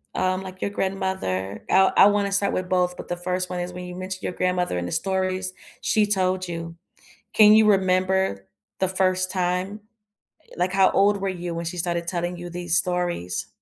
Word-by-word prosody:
um, 185 0 0
like, 185 0 -9
your 200 - -1
grandmother 190 - -2
I 190 0 +5
I - - +9
wanna 205 -1 +1
start 200 0 +1
with 185 0 -2
both, 180 -1 +1
but - - -9
the 175 - -2
1st 180 +1 -2
one 180 - -3
is 180 0 -4
when 180 - -7
you 180 - -8
mentioned 185 +1 -6
your - - -2
grandmother 180 - 0
and 90 0 -3
the - - -6
stories 185 +1 -1 0.3
she 215 -1 +2
told 185 -2 0
you 165 -1 -6 0.6
can 210 -1 +7
you 215 0 +6
remember 185 - +2 0.3
the 190 - +2
1st 185 0 +1
time? 185 +3 -1 0.6
Uh, - - -31
like, 180 +1 0
how 190 0 +4
old 200 +1 +3
were 195 - -1
you 175 -2 -4
when 170 - -4
she 170 +2 -4
started 170 0 -2
telling 175 0 -2
you 175 0 -8
these 175 0 -1
stories? 175 - -1
185 Hz, 200 wpm, -24 LUFS, 175-190 Hz, 0.6 s, I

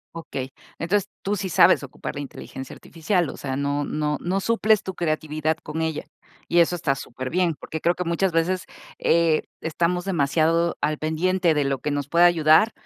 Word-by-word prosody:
Okey. 135 -5 -5 0.3
Entonces, 195 +4 0 0.2
tú 205 +1 0
sí 190 -1 -3
sabes 170 -1 +5
ocupar 140 +2 -7
la 145 - -4
inteligencia 135 -1 -8
artificial. 170 +1 -1
O - - -8
sea, 135 -2 -4
no 140 +1 -1
no 150 -1 -1
no 185 +3 -1
suples 220 0 +2
tu 190 - -6
creatividad 155 -1 -1
con 155 +2 -4
ella, 160 -1 -2 0.4
y 175 - +3
eso 170 +1 +4
está 150 -5 0
superbién, 135 +8 -2
porque 160 - -6
creo 170 +2 +2
que 180 - -3
muchas 175 +2 0
veces, 175 +3 0 0.3
eh, 165 -2 +2 0.2
estamos 175 +2 -1
demasiado 165 0 +2
al 150 0 0
pendiente 170 +2 +1
de 150 -1 +1
lo 135 0 0
que 150 - -2
nos 145 -1 -2
puede 170 +2 +5
ayudar, 170 +5 +5
165 Hz, 180 wpm, -24 LUFS, 150-180 Hz, 0.4 s, sabes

